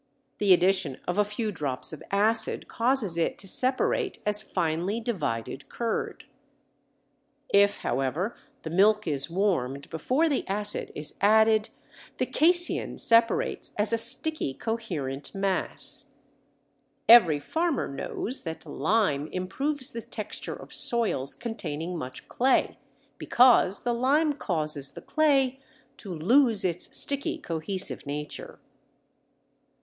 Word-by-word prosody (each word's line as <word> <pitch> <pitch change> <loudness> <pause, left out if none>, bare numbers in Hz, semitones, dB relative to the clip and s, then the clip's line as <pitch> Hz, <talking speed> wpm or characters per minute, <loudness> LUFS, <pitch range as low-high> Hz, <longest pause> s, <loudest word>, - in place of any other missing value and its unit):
The 205 -2 +2
addition 185 -5 +3
of 180 +3 -2
a - - +5
few 210 +1 -4
drops 145 -6 -4
of 155 - -9
acid 215 +3 +2
causes 230 -8 0
it 165 - -1
to 195 - -8
separate 265 - 0
as 210 0 +1
finely 175 +5 -2
divided 145 - -4
curd. 230 -2 -4 1.3
If, 200 0 +4
however, 135 - -2 0.3
the 160 - -6
milk 210 +4 +3
is 140 -2 -2
warmed 155 -8 -2
before 255 - 0
the 285 -4 -1
acid 205 +1 -2
is 150 0 -5
added 220 +1 +3 0.5
the - - 0
casein 350 +2 +2
separates 230 - +2
as 210 +2 +1
a - - +2
sticky 310 - +4
coherent 170 - -5
mass. 195 -1 0 0.9
Every 195 -11 +7
farmer 325 - -2
knows 215 - -5
that 160 -1 -7
lime 155 -1 0
improves 260 - -3
the 230 - -5
texture - - -5
of - - -12
soils 235 - +2
containing 180 -8 -6
much 130 -6 -7
clay, 260 +2 0 0.4
because 240 -6 +3
the 240 - -1
lime 290 +6 +1
causes 155 - -1
the - - -10
clay 270 -4 +1 0.4
to 200 - -9
lose 220 - +2
its 175 -1 0
sticky 285 +4 +5
cohesive 180 - -5
nature. 150 +1 -6
205 Hz, 120 wpm, -26 LUFS, 160-240 Hz, 1.3 s, Every